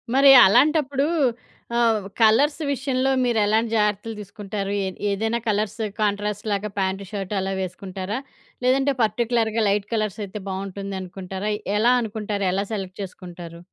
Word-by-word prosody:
మరి 275 Hz, 0 st, +8 dB, 0.2 s
అలాంటప్పుడు 280 Hz, +4 st, +3 dB, 0.7 s
ఆహ్, 225 Hz, -4 st, +2 dB, 0.2 s
కలర్స్ 285 Hz, +9 st, +4 dB
విషయంలో 265 Hz, 0 st, 0 dB
మీరు 235 Hz, -3 st, +1 dB
ఎలాంటి 220 Hz, +2 st, +1 dB
జాగ్రత్తలు 210 Hz, +1 st, 0 dB
తీసుకుంటారు? 200 Hz, 0 st, -5 dB
ఏ -, -, -1 dB, 0.2 s
ఏదైనా 225 Hz, +4 st, -1 dB
కలర్స్ 210 Hz, +1 st, 0 dB, 0.2 s
కాంట్రాస్ట్ 205 Hz, 0 st, -1 dB
లాగా 205 Hz, +1 st, -1 dB
ప్యాంట్ 190 Hz, +1 st, -1 dB
షర్ట్ 200 Hz, -1 st, -4 dB
అలా 190 Hz, 0 st, -2 dB
వేసుకుంటారా? 190 Hz, +3 st, -5 dB, 0.5 s
లేదంటే 270 Hz, +2 st, +3 dB
పర్టిక్యులర్‌గా 225 Hz, 0 st, +1 dB
లైట్ 200 Hz, 0 st, 0 dB
కలర్స్ 215 Hz, -2 st, -1 dB
అయితే 200 Hz, +2 st, -7 dB
బావుంటుందనుకుంటారయి. 195 Hz, +1 st, -4 dB, 0.2 s
ఎలా 240 Hz, +3 st, +4 dB
అనుకుంటారు? 210 Hz, -2 st, -3 dB
ఎలా 195 Hz, +1 st, 0 dB
సెలెక్ట్ 190 Hz, -2 st, -5 dB
చేసుకుంటారు? 175 Hz, -3 st, -9 dB
210 Hz, 125 wpm, -23 LUFS, 195-230 Hz, 0.7 s, మరి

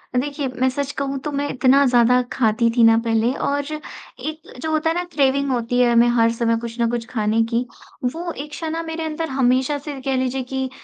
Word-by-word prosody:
अ, -, -, +3 dB
देखिए 285 Hz, +2 st, -1 dB
मैं 260 Hz, -, +4 dB
सच 280 Hz, +2 st, -3 dB
कहूँ 275 Hz, 0 st, -2 dB
तो 300 Hz, -, -2 dB
मैं 285 Hz, 0 st, -1 dB
इतना 265 Hz, +2 st, +4 dB
ज़्यादा 245 Hz, 0 st, +4 dB
खाती 230 Hz, -1 st, +2 dB
थी 235 Hz, -, +6 dB
ना 225 Hz, 0 st, +6 dB
पहले, 225 Hz, +1 st, +2 dB
और 285 Hz, +1 st, -1 dB, 0.6 s
एक 310 Hz, +1 st, -7 dB
जो 315 Hz, -, -2 dB
होता 315 Hz, +1 st, +1 dB
है 325 Hz, -, 0 dB
ना 355 Hz, -, 0 dB
क्रेविंग 280 Hz, -1 st, +2 dB
होती 245 Hz, 0 st, 0 dB
है 245 Hz, -1 st, +4 dB
हमें 235 Hz, 0 st, +5 dB
हर 230 Hz, 0 st, +4 dB
समय 230 Hz, 0 st, 0 dB
कुछ 235 Hz, 0 st, -7 dB
न 230 Hz, -, +2 dB
कुछ 235 Hz, -1 st, -2 dB
खाने 220 Hz, -1 st, +1 dB
की, 235 Hz, +2 st, +1 dB, 0.4 s
वो 330 Hz, +8 st, -2 dB
इच्छा 300 Hz, +2 st, -6 dB
ना 325 Hz, +1 st, -2 dB
मेरे 325 Hz, 0 st, -4 dB
अंदर 320 Hz, +1 st, -3 dB
हमेशा 260 Hz, +2 st, +1 dB
से 285 Hz, -1 st, -7 dB
कह 270 Hz, 0 st, -1 dB
लीजिए 260 Hz, 0 st, -1 dB
कि, 265 Hz, +1 st, -3 dB
260 Hz, 220 wpm, -21 LUFS, 235-290 Hz, 0.6 s, थी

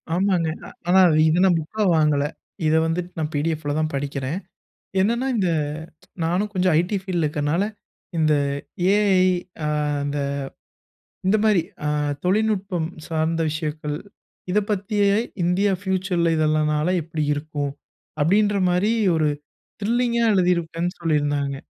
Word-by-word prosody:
ஆமாங்க. 180 Hz, -3 st, +1 dB, 0.2 s
அ, -, -, -9 dB, 0.2 s
ஆனா, 190 Hz, +2 st, +6 dB, 0.3 s
இத 160 Hz, +3 st, +2 dB
நான் 175 Hz, -3 st, +4 dB
புக்கா 210 Hz, +8 st, -3 dB
வாங்கல. 150 Hz, -2 st, +3 dB, 0.4 s
இத 155 Hz, -, +3 dB
வந்துட்டு 175 Hz, +2 st, -2 dB
நான் 155 Hz, 0 st, -2 dB
பிடிஎஃப்ல 150 Hz, 0 st, -1 dB
தான் 155 Hz, 0 st, 0 dB
படிக்கிறேன். 140 Hz, +4 st, -3 dB, 0.6 s
என்னன்னா, 235 Hz, +6 st, +1 dB
இந்த 190 Hz, -4 st, +1 dB, 0.7 s
நான்னு 180 Hz, +5 st, +1 dB
கொஞ்சம் 185 Hz, -2 st, +2 dB
ஐடி 180 Hz, +4 st, 0 dB
ஃபீல்ட்ல 180 Hz, -4 st, -1 dB
இருக்கறனால, 150 Hz, +5 st, 0 dB, 0.5 s
இந்த 155 Hz, -1 st, +3 dB, 0.6 s
ஏஐ, 205 Hz, -3 st, +3 dB, 0.5 s
ஆ, -, -, 0 dB, 0.4 s
அந்த 145 Hz, 0 st, -2 dB, 1.1 s
இந்த 215 Hz, +3 st, +4 dB
மாரி 215 Hz, -4 st, +4 dB, 0.3 s
அ -, -, +1 dB, 0.4 s
தொழில்நுட்பம் 195 Hz, -4 st, +1 dB, 0.2 s
சார்ந்த 165 Hz, +1 st, 0 dB
விஷயங்கள். 150 Hz, -1 st, -3 dB, 0.6 s
இதைப் 205 Hz, +1 st, +1 dB
பத்தி 205 Hz, +1 st, -2 dB
ஏஐ 200 Hz, +2 st, +3 dB, 0.2 s
இந்தியா 185 Hz, +4 st, +2 dB
ஃப்யூச்சர்ல 185 Hz, -3 st, 0 dB
இதெல்லாம் 155 Hz, 0 st, +2 dB
னால 150 Hz, +3 st, +1 dB
எப்படி 155 Hz, -1 st, -3 dB
இருக்கு. 145 Hz, 0 st, -3 dB, 0.6 s
அப்படின்ற 205 Hz, +6 st, +3 dB
மாரி, 180 Hz, +5 st, +2 dB, 0.2 s
ஒரு 155 Hz, -2 st, +2 dB, 0.5 s
த்ரில்லிங்கா 235 Hz, +2 st, +1 dB
எழுதியிருப்பேன் 175 Hz, -2 st, +1 dB
சொல்லி 165 Hz, -2 st, +1 dB
இருந்தாங்க. 145 Hz, -1 st, -1 dB
170 Hz, 125 wpm, -23 LUFS, 155-195 Hz, 1.1 s, ஆனா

